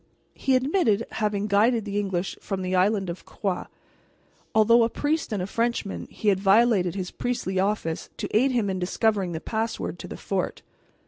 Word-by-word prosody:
He 265 - +1
admitted 255 - +2
having 210 -2 -1
guided 215 +2 +3
the 205 0 -1
English 190 -2 -2
from 195 -2 -3
the 185 0 -2
island 195 +1 +2
of 170 +1 -6
Groix. 190 -3 -3 0.9
Although 230 +2 +6
a 230 - +2
priest 295 +2 -1
and 200 -4 -1
a - - -1
Frenchman, 230 0 -2
he 215 - -1
had 190 -2 +2
violated 195 -2 +4
his 185 -2 -4
priestly 235 -6 -2
office 190 -5 -1
to - - -3
aid 255 +5 +4
him 235 -5 +1
in 190 -1 -2
discovering 195 0 0
the 160 - -3
password 225 +5 -3
to - - -7
the - - -7
fort. - - -3
205 Hz, 180 wpm, -25 LUFS, 190-230 Hz, 0.9 s, Although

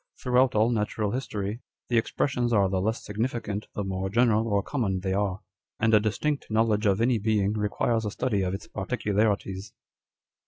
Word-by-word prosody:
Throughout 125 0 +3
all 110 +3 +3
natural 105 -2 -1
history, 110 -3 -3 0.3
the 120 -1 +3
expressions 120 +1 -1
are 100 -4 +4
the 95 0 0
less 110 +4 -2
significant 110 -1 -3
the 105 - -2
more 95 0 -2
general 115 0 +3
or 100 -2 +1
common 100 -10 -1
they 95 0 -1
are; 100 -1 -1 0.4
and 110 0 +2
a 105 - +8
distinct 135 +8 -1
knowledge 110 -1 +2
of 100 +2 +2
any 120 -1 +3
being 105 -1 +1
requires 110 +2 0
a 105 - -1
study 105 -1 -1
of 95 0 -1
its 100 - -8
particularities." 105 -2 -1
105 Hz, 170 wpm, -27 LUFS, 100-115 Hz, 0.4 s, a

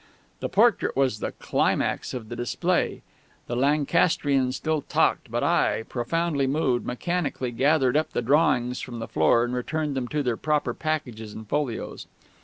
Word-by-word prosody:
The - - -3
portrait 225 - +3
was 130 -6 +2
the - - -3
climax - - 0
of 110 -3 -7
the 120 - -5
display. 120 -2 -1 0.4
The 120 - -4
Lancastrian 140 0 +2
still 155 +3 -1
talked; - - +1
but - - -1
I, - - +2
profoundly 140 +4 -1
moved, 135 -3 0
mechanically 140 -2 -2
gathered 135 +1 +2
up 155 +1 +2
the - - -1
drawings 125 -2 +2
from 120 -2 -6
the 115 - -5
floor 80 +9 +3
and 120 +1 -2
returned 150 +4 -2
them 130 -2 -2
to 150 +3 -1
their 120 -3 0
proper 150 -5 0
packages 125 -8 -4
and 110 -1 -9
folios. 140 -2 -3
130 Hz, 160 wpm, -25 LUFS, 120-150 Hz, 0.4 s, portrait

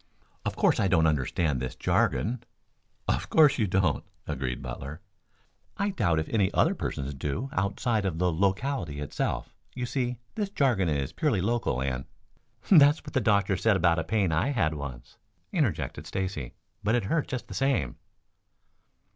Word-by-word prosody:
"Of - - -1
course - - +3
I 100 - +3
don't 85 -4 +4
understand 75 -1 +1
this 65 +1 -4
jargon." 120 +2 +1 0.6
"Of - - 0
course 150 -4 +5
you 110 - +2
don't," 90 -5 +1 0.2
agreed 65 -2 -3
Butler. 70 +5 -6 0.8
"I 200 +1 0
doubt 85 - +1
if 80 - -1
any 100 -4 +2
other - - +4
persons 70 +1 -4
do 75 - -3
outside 100 +3 0
of 95 -5 -1
the 90 0 +1
locality 95 - 0
itself. 75 - -3 0.2
You 125 -1 -2
see 125 -1 -2 0.2
this 210 -3 -2
jargon 125 - +2
is 70 -3 -1
purely 145 - +1
local 100 - 0
and 65 -1 -2 0.4
" - - -24
"That's 150 -4 +7
what 150 - -9
the 130 - +2
doctor 100 -2 +3
said 110 +3 +3
about 85 -2 +3
a - - -1
pain 100 -2 +1
I 80 - +1
had 95 - +1
once," 70 -5 -8 0.3
interjected - - -1
Stacy. 95 -10 -4 0.3
"But 110 +4 +2
it 120 - +1
hurt 150 +10 0
just 125 - -4
the - - -8
same." 130 - 0
95 Hz, 165 wpm, -28 LUFS, 75-120 Hz, 0.8 s, That's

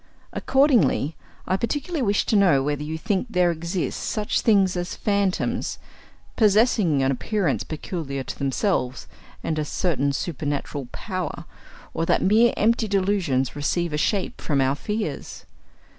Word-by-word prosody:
Accordingly, 235 - +2 0.3
I 185 - +1
particularly 290 - -2
wish 205 -4 +1
to - - +1
know 175 -10 +4
whether 145 0 -1
you 155 +2 -4
think 200 +5 -1
there 180 -4 +3
exist 170 +2 -3
such 210 -1 -1
things 195 -4 +3
as 175 0 -3
phantoms, 200 -3 0 0.6
possessing 210 - +3
an 135 - +2
appearance 180 - -1
peculiar 150 -4 -5
to - - -7
themselves, 135 -1 -1 0.4
and 155 -1 -1
a - - 0
certain 145 -3 0
supernatural 145 -2 -3
power, 185 -6 -5 0.5
or 165 - -1
that - - +2
mere 225 +5 +5
empty 225 +1 +2
delusions 185 -11 0
receive 160 +3 -1
a - - 0
shape 190 +5 -1
from 145 -3 0
our 135 0 +3
fears. 210 +8 -4
180 Hz, 140 wpm, -24 LUFS, 145-210 Hz, 0.6 s, mere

